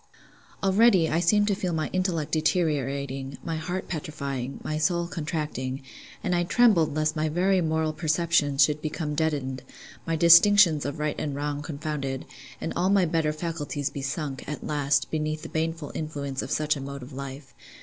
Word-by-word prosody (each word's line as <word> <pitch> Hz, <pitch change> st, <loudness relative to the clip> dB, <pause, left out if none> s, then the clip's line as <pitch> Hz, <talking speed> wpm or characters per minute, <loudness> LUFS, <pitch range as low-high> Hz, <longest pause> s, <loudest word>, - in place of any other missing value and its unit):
Already, 195 Hz, -3 st, +5 dB
I 160 Hz, -, +2 dB
seemed 205 Hz, +4 st, +3 dB
to -, -, +3 dB
feel 185 Hz, -2 st, -2 dB
my 155 Hz, -1 st, -1 dB
intellect 175 Hz, -5 st, -1 dB
deteriorating, 140 Hz, -5 st, -1 dB
my 165 Hz, -2 st, -3 dB
heart 175 Hz, +4 st, -4 dB
petrifying, 140 Hz, -6 st, -4 dB
my 155 Hz, 0 st, -2 dB
soul 170 Hz, +2 st, +1 dB
contracting; 150 Hz, -6 st, -4 dB, 0.4 s
and 180 Hz, -, 0 dB
I 175 Hz, 0 st, +2 dB
trembled 175 Hz, -7 st, +3 dB
lest 155 Hz, 0 st, +1 dB
my 155 Hz, 0 st, 0 dB
very 185 Hz, +4 st, +2 dB
moral 160 Hz, -1 st, 0 dB
perceptions 155 Hz, -3 st, +2 dB
should 150 Hz, +1 st, +1 dB
become 155 Hz, -1 st, -3 dB
deadened, 145 Hz, -4 st, -1 dB, 0.5 s
my 165 Hz, -, +1 dB
distinctions 170 Hz, 0 st, +6 dB
of 145 Hz, -, -3 dB
right 150 Hz, 0 st, -1 dB
and 145 Hz, -2 st, -3 dB
wrong 145 Hz, 0 st, -2 dB
confounded, 145 Hz, -3 st, -4 dB, 0.3 s
and -, -, -3 dB
all 185 Hz, -, +1 dB
my 195 Hz, -2 st, +4 dB
better 160 Hz, -2 st, +1 dB
faculties 150 Hz, -3 st, -3 dB
be 140 Hz, -, -5 dB
sunk, 135 Hz, 0 st, -3 dB
at 150 Hz, -, -5 dB
last, 145 Hz, -1 st, +1 dB
beneath 155 Hz, 0 st, -2 dB
the -, -, -7 dB
baneful 160 Hz, -1 st, -2 dB
influence 140 Hz, -4 st, -4 dB
of -, -, -6 dB
such 155 Hz, 0 st, +1 dB
a 140 Hz, -, -6 dB
mode 140 Hz, -1 st, -6 dB
of 130 Hz, +3 st, -11 dB
life. 135 Hz, +1 st, -8 dB
155 Hz, 170 wpm, -26 LUFS, 145-170 Hz, 0.5 s, distinctions